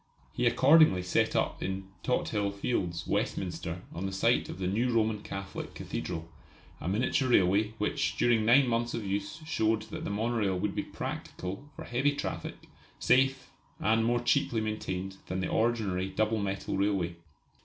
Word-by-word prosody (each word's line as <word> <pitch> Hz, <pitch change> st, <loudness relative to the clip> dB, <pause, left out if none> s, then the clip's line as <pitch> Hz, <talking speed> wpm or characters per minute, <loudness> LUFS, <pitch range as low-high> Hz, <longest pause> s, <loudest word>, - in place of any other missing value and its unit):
He 120 Hz, -, +1 dB
accordingly 135 Hz, -, +6 dB
set 90 Hz, -, +1 dB
up -, -, 0 dB
in 95 Hz, 0 st, -3 dB
Tothill 105 Hz, -5 st, 0 dB
Fields, 90 Hz, -5 st, -2 dB
Westminster, -, -, -2 dB
on 90 Hz, +4 st, -3 dB
the -, -, -4 dB
site 95 Hz, -, +2 dB
of -, -, -6 dB
the 95 Hz, -, -3 dB
new 115 Hz, +7 st, +1 dB
Roman 110 Hz, -2 st, +1 dB
Catholic 100 Hz, -2 st, -6 dB
Cathedral, 80 Hz, -2 st, -4 dB, 0.5 s
a -, -, -5 dB
miniature 125 Hz, -, +1 dB
railway 105 Hz, 0 st, +3 dB
which 105 Hz, -1 st, -1 dB
during 115 Hz, -1 st, +3 dB
nine 125 Hz, +4 st, +6 dB
months 120 Hz, 0 st, 0 dB
of 115 Hz, -3 st, -4 dB
use 100 Hz, +11 st, -3 dB
showed 110 Hz, -8 st, +1 dB
that -, -, -5 dB
the -, -, -3 dB
monorail 105 Hz, -2 st, 0 dB
would 100 Hz, +2 st, -1 dB
be -, -, -1 dB
practical 100 Hz, +10 st, -6 dB
for -, -, -7 dB
heavy 135 Hz, +4 st, +1 dB
traffic, -, -, -5 dB, 0.3 s
safe, 135 Hz, +1 st, +2 dB, 0.3 s
and 110 Hz, +1 st, +2 dB
more 120 Hz, +1 st, +2 dB
cheaply 120 Hz, -1 st, +2 dB
maintained 95 Hz, -3 st, -3 dB
than 90 Hz, +1 st, -2 dB
the 90 Hz, -, -1 dB
ordinary 105 Hz, -5 st, 0 dB
double 110 Hz, +2 st, 0 dB
metal 100 Hz, -1 st, -2 dB
railway. 95 Hz, -4 st, 0 dB
105 Hz, 160 wpm, -30 LUFS, 95-120 Hz, 0.5 s, accordingly